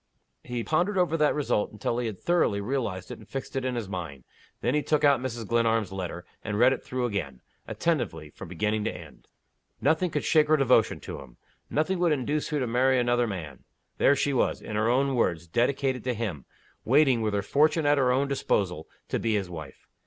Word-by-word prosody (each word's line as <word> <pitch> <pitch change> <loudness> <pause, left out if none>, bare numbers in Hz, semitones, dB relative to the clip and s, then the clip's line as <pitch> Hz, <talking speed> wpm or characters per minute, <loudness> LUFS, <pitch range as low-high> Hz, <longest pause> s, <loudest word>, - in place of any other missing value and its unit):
He 120 -2 -4
pondered 180 - +1
over 180 -3 +2
that 150 -2 +2
result 140 -8 0
until 110 +3 -2
he 120 - -1
had 105 -4 -6
thoroughly 170 -12 +1
realized 100 -5 -3
it - - -7
and 110 - -15
fixed 135 0 -6
it 135 - -1
in 130 -1 -1
his 115 -4 -3
mind. 85 -9 -6 0.4
Then - - +1
he 150 - +2
took 150 0 0
out 140 -3 +5
Mrs. 120 -3 -4
Glenarm's 115 -3 +1
letter, 90 -2 -5 0.2
and 105 -1 -3
read 125 +4 +5
it - - -5
through 125 -1 -2
again, 75 - -3 0.3
attentively, 105 - -2
from - - -10
beginning 105 +5 -1
to - - 0
end. - - -12 0.5
Nothing 170 +3 +2
could 150 -2 -2
shake 155 -2 +4
her 155 0 +4
devotion 125 -5 +3
to - - -7
him. 65 -3 -14 0.3
Nothing 165 +5 0
would 175 -2 +3
induce 145 +2 -1
her 150 -2 -1
to 130 - 0
marry 130 +3 +2
another 120 0 +2
man. 80 - -6 0.4
There 140 - +5
she 140 0 0
was 130 - +1
in 105 - -7
her 110 +2 +2
own 135 +2 +2
words 85 -9 0
dedicated 125 - 0
to 125 -2 0
him: 100 - -4 0.4
waiting, 135 -2 +4
with 105 -2 0
her 100 - 0
fortune 155 - +2
at 145 0 +4
her 125 -2 +3
own 135 +2 +2
disposal, 95 - -1 0.2
to - - -1
be 115 -2 0
his 95 -3 -2
wife. 80 -4 -9
120 Hz, 210 wpm, -27 LUFS, 100-140 Hz, 0.5 s, out